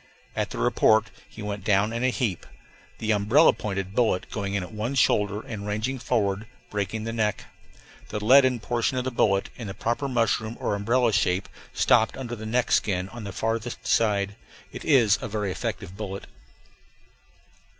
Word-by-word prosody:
At - - -1
the - - -7
report 110 -1 +3 0.2
he 110 - -9
went 105 -1 -4
down 105 +2 +2
in 115 +1 -2
a 130 - +4
heap, 120 - -2 0.5
the 110 0 -1
"umbrella 110 +10 +5
pointed" 95 -2 -4
bullet 110 -5 +1
going 100 -1 -3
in 100 - 0
at 90 - -9
one 110 +6 -3
shoulder, 105 -5 +2
and 105 -3 -7
ranging 110 +6 -2
forward, 105 -4 0 0.2
breaking 105 +2 -2
the 115 0 -4
neck. 110 -2 -1 0.6
The 105 - -3
leaden 130 0 +6
portion 120 +3 -1
of 125 - 0
the 130 - -2
bullet, 100 -4 +1
in 115 - -6
the 95 - -6
proper 120 +5 -1
mushroom 115 -2 0
or - - -1
umbrella 115 +3 +2
shape, 95 -2 +1 0.2
stopped 110 - +3
under 120 -3 -5
the 110 -1 -7
neck 125 +2 0
skin 95 -2 +1
on 120 -1 -8
the 100 - -5
farther 115 +3 -2
side. 100 -3 +1 0.4
It - - -8
is 120 -9 +4
a - - -3
very 105 -2 -2
effective 90 0 -4
bullet. 100 -1 -6
110 Hz, 175 wpm, -26 LUFS, 100-120 Hz, 0.6 s, leaden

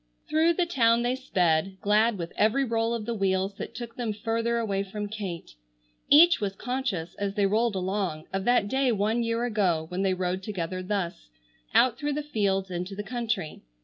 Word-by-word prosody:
Through 320 +2 +3
the 355 +1 +1
town 235 -7 +3
they 245 +1 +1
sped, 185 -7 0
glad 215 +2 +3
with 170 -1 -6
every 225 +6 +2
roll 230 0 0
of 220 -2 -5
the 235 - -2
wheels 195 -1 0
that - - -7
took 235 -1 -7
them 235 -4 -2
further 230 +2 -1
away 200 -4 -1
from 205 +1 -5
Kate. 200 -5 -6 0.6
Each 335 +1 +7
was 195 -1 -2
conscious, 245 -9 -3
as 200 -1 -2
they 205 - +2
rolled 220 +2 +1
along, 185 -4 -2
of 195 0 -1
that 245 -4 +3
day 265 +2 +1
one 220 +2 +1
year 230 +1 0
ago 190 -9 +1
when 180 +1 -3
they 190 -1 +1
rode 185 0 -2
together 185 -3 -4
thus, 185 - -3 0.5
out 250 -2 +4
through 295 -1 -1
the 300 +1 -2
fields 195 -8 -1
into 180 +2 -4
the 205 - -4
country. 230 -8 -3
210 Hz, 190 wpm, -27 LUFS, 190-235 Hz, 0.6 s, Each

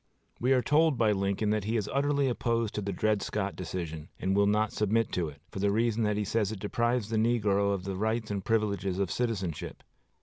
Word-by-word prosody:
We 125 +2 +1
are 125 -2 +2
told 155 -1 +3
by 110 -2 +3
Lincoln 100 +1 0
that 105 -2 0
he 115 +2 0
is 105 -2 -2
utterly 140 0 +2
opposed 115 -3 0
to 105 - -2
the 100 0 -3
Dred 105 +2 +1
Scott 100 -2 -2
decision, 80 -3 -5
and 95 +1 0
will 100 0 +4
not 105 +1 +1
submit 110 +2 +1
to 85 -3 -1
it, 70 -1 -14
for - - -6
the 100 +1 +2
reason 115 +1 +1
that 105 0 0
he 105 - 0
says 105 0 0
it 110 - -5
deprives 120 +2 0
the 110 - +1
negro 105 -3 +2
of 100 -2 -2
the 95 0 -4
rights 110 +2 -1
and 100 -2 -2
privileges 100 -4 0
of 100 -2 -1
citizenship. 95 -9 -3
105 Hz, 225 wpm, -29 LUFS, 95-115 Hz, -, will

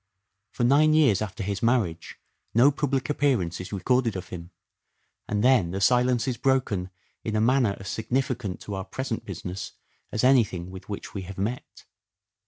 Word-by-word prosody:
For - - -3
nine 150 +5 +5
years 130 - +4
after 105 0 -4
his 100 0 -3
marriage 115 -9 0 0.4
no 130 +5 +6
public 135 -2 -1
appearance 125 - 0
is 90 - -8
recorded 115 +2 +1
of 95 -1 -6
him; 85 -1 -8 0.8
and 105 0 -1
then 125 -9 +4
the 95 +3 -3
silence 125 +3 +3
is 125 -2 -1
broken 115 -9 0 0.3
in 110 - -2
a - - +2
manner 120 -2 +2
as 95 - -7
significant 120 -4 -2
to 105 - -6
our 95 -1 -3
present 130 -1 -4
business 90 0 -6 0.4
as 110 - -1
anything 105 -9 +3
with 95 +1 -11
which 100 - -6
we 100 - -4
have 95 +1 -9
met. 110 +6 -4
110 Hz, 170 wpm, -26 LUFS, 95-130 Hz, 0.8 s, no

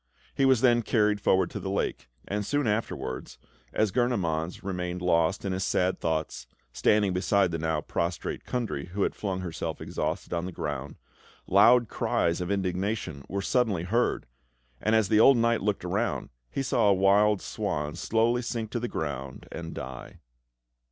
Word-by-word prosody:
He 135 - +2
was 130 -3 +4
then 120 -2 +5
carried 105 -2 +1
forward 95 -3 +2
to - - -5
the 95 - -4
lake; 95 -9 -2 0.2
and 105 +1 -2
soon 145 +6 0
afterwards 105 - -3 0.3
as 110 -2 +1
Gurnemanz 90 -9 -1
remained 90 -2 -3
lost 85 +3 +2
in 95 - -1
his 95 0 -2
sad 90 0 +1
thoughts, 80 -6 -2 0.3
standing 105 -3 +2
beside 95 0 +2
the 80 - -2
now 80 -1 0
prostrate 85 +2 -3
Kundry, 120 -7 -3
who 100 0 0
had - - 0
flung 95 -3 -3
herself 85 -3 -4
exhausted - - -3
on 85 0 -1
the - - -5
ground 75 -3 -4 0.5
loud 120 +5 +6
cries 85 -3 0
of 90 - -3
indignation 95 -5 -2
were 100 +1 -2
suddenly 110 -7 +1
heard, 115 +7 0 0.6
and 110 +1 +2
as 110 -3 +3
the 110 0 +4
old 135 +3 +7
knight 115 0 +2
looked 105 -1 -1
around, - - -1 0.2
he 135 - -2
saw 120 -5 +2
a - - +6
wild 100 +2 +4
swan 75 -2 -3
slowly 115 +6 +1
sink 115 -2 -4
to 120 - -1
the 120 - -2
ground 70 - -5
and 80 0 -6
die. 65 -1 -8
95 Hz, 170 wpm, -28 LUFS, 85-110 Hz, 0.6 s, old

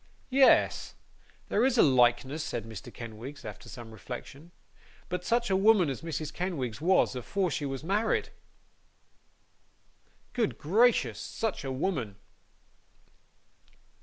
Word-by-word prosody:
'Yes! 270 0 +4 0.5
there 215 - +2
is 260 -1 +2
a - - +7
likeness,' 130 +3 +3
said 115 -2 -4
Mr. 110 -3 -9
Kenwigs, 120 +5 -9
after 105 +2 -9
some 115 +2 -9
reflection. 135 +7 -9 0.6
'But 180 -1 -3
such 235 +1 +1
a - - +4
woman 195 -5 +4
as 130 - -6
Mrs. 155 -2 -4
Kenwigs 150 -10 -3
was, 180 -4 +3
afore 180 - -1
she 145 0 -2
was 135 0 -5
married! 205 +6 0 2.0
Good 230 -4 0
gracious, 220 +10 +3
such 225 -8 -3
a 135 - -3
woman! 130 - -2
150 Hz, 120 wpm, -29 LUFS, 125-195 Hz, 2.0 s, a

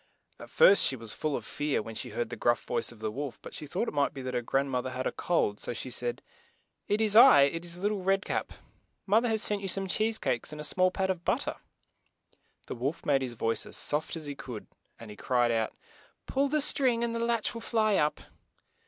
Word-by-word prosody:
At - - -10
first 200 - +6
she 135 - +2
was 115 -3 -7
full 155 -2 -2
of - - -5
fear, 145 -1 -1
when 115 - -8
she 125 - -5
heard 120 +2 -3
the - - -3
gruff 120 +1 +1
voice - - -2
of 120 - -14
the 110 -1 -2
wolf, 140 +3 -5
but - - -9
she 150 - -5
thought 185 +10 -2
it - - -4
might 145 0 +1
be 135 - -6
that 130 0 -4
her 125 - 0
grand 135 +3 0
moth 125 0 -1
er - - -3
had 130 0 -4
a - - 0
cold, 105 -12 0
so - - -4
she 130 +2 -5
said, 120 0 -3 0.6
"It 210 +2 +1
is 215 -1 +2
I; 145 -11 +9
it 165 +4 0
is 175 +2 -6
Lit 205 - +2
tle 205 -2 -3
Red 195 +1 +1
Cap. - - -2 0.5
Moth 220 +4 +3
er - - +2
has 220 -2 +1
sent 205 -1 +1
you 195 - -4
some 195 +1 -1
cheese 220 +3 +1
cakes 130 - -2
and 150 - -8
a - - -5
small 185 +4 +2
pat 190 +1 -1
of 175 -2 -5
but - - +1
ter." - - -3 1.1
The - - -5
wolf 135 +7 -3
made 140 -2 +3
his 125 -2 -3
voice 115 0 -1
as - - -3
soft 150 +3 -1
as 160 -2 -6
he 145 - -4
could 125 -5 -8 0.3
as 115 - -10
he 105 - -9
cried 120 +1 +1
out, 115 -1 0 0.5
"Pull 275 +1 +1
the 300 +2 +1
string 255 -5 +2
and 235 -1 -1
the 230 - -2
latch 235 -2 0
will 230 - -7
fly 215 -3 +2
up." 150 0 +1
150 Hz, 255 wpm, -29 LUFS, 125-205 Hz, 1.1 s, I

